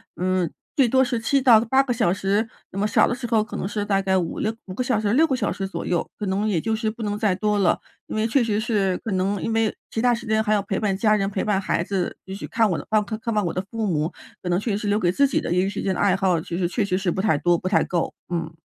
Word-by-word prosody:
嗯， 185 -2 0 0.3
最 270 -3 +5
多 260 +3 +4
是 245 -2 -1
7 275 +4 +1
到 240 -4 +7
8 265 +4 +3
个 255 -2 -1
小 220 -7 +2
时。 200 +3 0 0.2
那 195 - -5
么 210 - +2
少 - - +4
的 - - -1
时 245 0 -6
候 225 -2 +2
可 225 - -9
能 - - -2
是 205 0 -2
大 195 -1 +1
概 190 -1 +1
5-6 185 +5 -1
5 185 - -6
个 210 - -3
小 250 -4 +1
时、 205 -1 0
6 315 +6 +5
个 270 - +1
小 - - -1
时 195 - -3
左 195 - -5
右， 175 -2 -1
可 210 - -4
能 195 +3 0
也 195 -6 +1
就 225 - -1
是 220 0 -1
不 225 +1 -6
能 205 0 -2
再 210 -4 +2
多 210 +1 0
了。 190 - +3 0.3
因 - - -5
为 215 +1 +1
确 245 +3 +2
实 215 -2 0
是 205 -5 0
可 225 - -5
能 190 +2 0
因 225 - -2
为 225 -1 +1
其 - - -3
它 245 0 +4
时 235 0 -5
间 220 0 +2
还 215 -1 +1
要 210 - +2
陪 195 -1 -3
伴 200 -3 0
家 215 +2 +3
人， 195 -2 0
陪 195 -1 -2
伴 205 -2 +1
孩 190 -3 0
子， 185 -1 -2
就 190 - -6
去 200 - -6
看 225 -2 +2
我 170 - 0
的 - - -7
看 215 -1 +4 0.2
看 230 0 -3
望 210 -1 +1
我 - - -1
的 185 - -2
父 225 -2 -2
母， 160 -2 0 0.3
可 180 - -3
能 175 +1 +2
确 220 +2 -2
实 - - 0
是 210 - -4
留 205 +1 +2
给 175 - +2
自 280 +10 +3
己 265 - 0
的 - - -4
业 180 - +3
余 - - -1
时 205 - -4
间 190 -1 -1
的 - - -4
爱 195 -2 +4
好， 190 -3 +1
其 170 - -6
实 180 -1 +1
确 210 +5 -1
实 185 -2 0
是 190 -2 -1
不 175 - -2
太 205 -5 +2
多， 175 +2 +3
不 185 - -4
太 - - +3
够， 175 -2 -1 0.2
嗯。 165 -2 -3
205 Hz, 325 characters per minute, -23 LUFS, 190-225 Hz, 0.3 s, 到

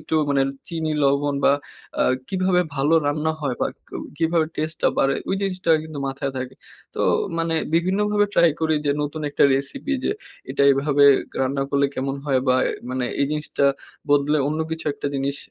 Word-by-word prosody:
একটু 155 +1 -4 0.2
মানে 140 -1 +3 0.3
চিনি 160 -2 -2
লবণ 140 +1 +2
বা - - +6 0.5
আ - - +5 0.3
কিভাবে 185 -1 +2
ভালো 145 +3 +2
রান্না 150 +2 0
হয় 140 -4 -1
বা - - +2 0.2
ক - - -30 0.3
কিভাবে 165 -1 +2
টেস্টে 155 +2 -3
টা - - +5
বাড়ে 135 0 +3
ওই - - +1
জিনিসটা 185 -3 -1
কিন্তু 155 -2 -8
মাথায় 135 0 -3
থাকে। 130 0 -5 0.4
তো - - -8 0.4
মানে 165 0 0 0.2
বিভিন্নভাবে 205 +4 +2
ট্রাই 170 -1 +5
করি 160 -1 +2
যে 145 - +2
নতুন 145 +2 -4
একটা - - +1
রেসিপি 260 - -3
যে - - +1 0.4
এটা 140 - +1
এভাবে 140 +1 +3 0.4
রান্না 135 +1 0
করলে 140 0 +3
কেমন 135 +1 -2
হয় 135 -2 +2
বা 125 - +5 0.4
মানে 130 0 -1 0.2
এই 140 - +3
জিনিসটা 150 -2 -1 0.5
বদলে 145 +1 +3
অন্য 155 +1 -2
কিছু 160 0 -4
একটা 145 - -5
জিনিস 140 +1 -1
150 Hz, 180 wpm, -22 LUFS, 140-165 Hz, 0.5 s, বা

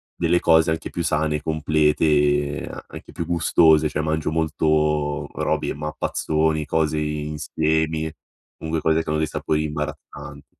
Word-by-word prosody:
delle 85 +1 +2
cose 80 0 +4
anche 80 - -3
più 85 - -3
sane, 75 -1 0
complete, 75 -2 +1
an - - -8
anche - - -11
più 85 - -4
gustose. 80 -2 +4
Cioè 75 +1 -2
mangio 80 0 -1
molto 75 -2 0
robi - - -1
e - - -2
mappazzoni, 75 +1 -1
cose 80 0 0
insiemi. 80 +1 -1 0.5
Comunque 80 0 -2
cose 80 0 +2
che - - -7
hanno 75 - +1
dei 80 - 0
sapori 75 0 -1
imbarazzant 75 -1 -6
75 Hz, 140 wpm, -22 LUFS, 75-80 Hz, 0.5 s, cose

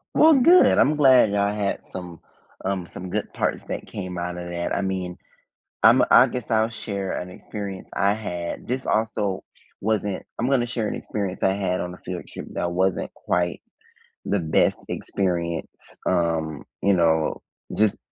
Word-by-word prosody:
Well, 315 +1 +7
good, 330 +7 +6
I'm 150 - +4
glad 130 -7 +6
I 100 0 +2
had 105 -1 -1
some, 90 -3 -8 0.4
um, 95 -2 -2
some 90 +2 -8
good - - -3
parts - - -1
that - - -4
came 90 -2 -6
out 90 0 -3
of 90 0 -6
that. 85 0 -3
I - - 0
mean, 95 -2 -3 0.7
I'm - - +7
I - - +8
guess 125 -3 -5
I'll 110 -1 +3
share 100 -4 -4
an 90 - -4
experience 100 +1 -7
I 100 +1 +2
had. 90 -5 -5
This 130 +2 -3
also 105 -3 0 0.4
wasn't 105 -2 -1 0.2
I'm 120 +3 +1
gonna 130 -3 +3
share 120 -3 -2
an - - -3
experience 100 -3 -4
I 95 - +4
had 95 -2 -1
on 90 0 -4
a - - -10
field 90 -1 -4
trip - - -7
that 85 - -1
wasn't 95 +1 0
quite 90 -1 -1 0.6
the 100 - 0
best 80 -2 +2
experience, 85 -3 -3
um, 80 -4 0 0.2
you 100 - +4
know, 80 -3 +2 0.3
just 105 -1 +3
95 Hz, 170 wpm, -24 LUFS, 90-110 Hz, 0.7 s, I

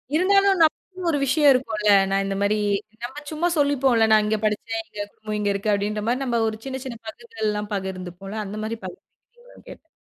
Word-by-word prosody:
இருந்தாலும் 390 +2 +4
நமக்கு 365 +3 -1
ஒரு 290 - +1
விஷயம் 285 +2 +5
இருக்கும்ல. 215 -5 0 0.2
நான் 195 0 +2
இந்த 195 0 -2
மாரி 205 +1 +2 0.5
நம்ம 270 +5 -6
சும்மா 310 +3 0
சொல்லிப்போம்ல, 270 -5 +3
"நான் 215 -1 +6
இங்க 215 +1 +1
படிச்சேன். 225 +1 -2
எங்க 205 - -5
குடும்பம் 215 -1 -5
இங்க 205 -1 0
இருக்கு." 200 +2 -1
அப்டின்ற 210 +1 -1
மாரி 250 +3 0
நாம 240 -3 0
ஒரு 220 - -6
சின்ன, 265 -1 -4
சின்ன 235 -3 -6
பகுதிகள்லாம் 215 - -4
பகிர்ந்துப்போம்ல, 190 +1 -6
அந்த 205 +2 -6
மாரி 225 +1 -3
பகிர்ந்துபீங்களானு 480 +5 -15
கேட்டேன். 320 - -13
225 Hz, 180 wpm, -23 LUFS, 210-290 Hz, 0.5 s, நான்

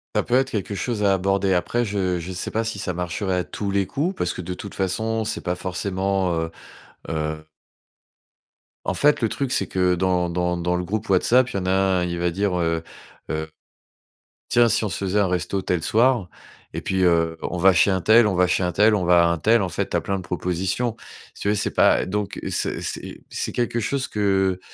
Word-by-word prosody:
Ça - - +2
peut 120 - 0
être 130 +1 +3
quelque 105 -1 -3
chose 105 +2 -2
à 100 -1 +4
aborder. 95 0 +1
Après, 115 +7 0
je 95 -4 -1
je 85 +2 -6
sais 90 - -4
pas 115 - 0
si 115 -2 -4
ça 95 -2 -3
marcherait 90 +2 -2
à - - -1
tous 100 +2 -5
les 100 0 +1
coups 150 - -2
parce 90 - -1
que - - -6
de 90 +1 -5
toute 100 +2 -8
façon, 110 +4 -1
c'est - - -3
pas 90 - -2
forcément, 95 0 -1
heu 80 0 -2 0.6
heu 80 -1 -3 1.4
En - - 0
fait, 150 -1 +3
le 115 - +1
truc, 135 +1 -3
c'est 100 - 0
que 90 -1 +1
dans 90 -1 +1
dans 90 +1 0
dans 90 +1 0
le 90 - -1
groupe 105 +4 -3
WhatsApp, 120 +7 +4
il - - -8
y - - 0
en 90 - -5
a 90 - +1
un, 95 -1 +2
il 85 -1 -3
va 85 0 +1
dire: 100 +2 0
«Heu 85 -1 0 0.5
heu, 80 0 -2 1.0
tiens, 120 -1 +5
si - - +2
on 105 - -1
se 85 - -3
faisait 95 +2 +1
un 100 - +3
resto 90 +2 -1
tel 90 -2 -1
soir 115 -4 +2 0.4
et - - -4
puis, 95 -1 0
heu, 80 -2 +2
on 90 - -3
va 95 +2 +6
chez 95 +3 +4
un 95 -1 0
tel, 110 +3 +6
on 95 - 0
va 90 +1 +4
chez 90 - +1
un 90 -1 0
tel, 105 +5 +4
on 95 -4 +1
va 85 0 +5
à - - +3
un 85 - 0
tel», 115 +6 +3
en 95 - -1
fait, 80 - -3
tu - - -1
as - - -1
plein 100 - -2
de - - -5
propositions. 90 +6 -2 0.4
Si - - -9
tu - - -2
veux 105 - +2
c'est 100 - -1
pas, - - +4
heu - - -3
donc, 100 +1 -3
heu, - - -3
c'est - - -1
c'est - - -5
c'est - - -3
quelque 120 -1 -1
chose 130 +4 -1
que 95 -3 +1
95 Hz, 240 wpm, -23 LUFS, 90-105 Hz, 1.4 s, va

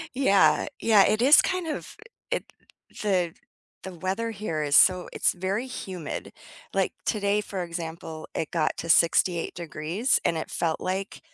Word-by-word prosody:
Yeah, 225 -7 +4 0.2
yeah, 215 -3 +5
it 215 +2 +1
is 275 +5 +8
kind 365 -3 -2
of 310 - -5 0.4
it - - -1 0.6
the 180 -5 +1 0.5
the 190 - -7
weather 190 +7 -3
here 195 -8 -3
is 145 -1 +1
so 185 -1 +5
it's - - +1
very 195 +7 -2
humid, 185 - -6 0.4
like, - - 0
today, 205 -1 +1
for 195 -3 -5
example, 165 -2 -7
it 160 - -3
got 160 -3 0
to 165 - -6
68 170 +1 +3
degrees, 170 - -1
and 165 - +1
it 160 - -5
felt 165 -2 -1
like 190 +2 -3
185 Hz, 155 wpm, -26 LUFS, 165-210 Hz, 0.6 s, is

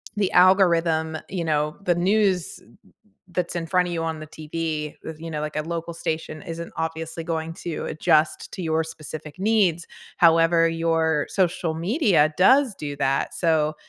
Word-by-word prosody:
the 205 -2 0
algorithm, 170 -4 +4
you 180 -2 -3
know, 150 -1 0
the 175 -2 +2
news 190 -1 +1 0.7
that's 175 0 -3
in 170 -1 -2
front 180 +1 +2
of 175 - -4
you 165 -1 -2
on 160 -1 -3
the 155 - -9
TV, 155 0 -4
y 160 - -6
you 165 +1 -8
know 150 -1 -3
like 150 0 -5
a - - +1
local 170 +1 -4
station 160 -1 -4
isn't 170 -2 -7
obviously 160 0 -4
going 160 0 -3
to 170 -1 -5
adjust 155 0 +1
to - - -5
your 160 -1 0
specific 155 -1 -9
needs. 190 -5 +2 0.3
However, 165 0 +5
your 165 -2 +1
social 175 -3 0
media 170 - +2
does 260 +6 +5
do 145 -4 -5
that. 135 0 0
So, 155 -3 +1
165 Hz, 165 wpm, -24 LUFS, 160-175 Hz, 0.7 s, However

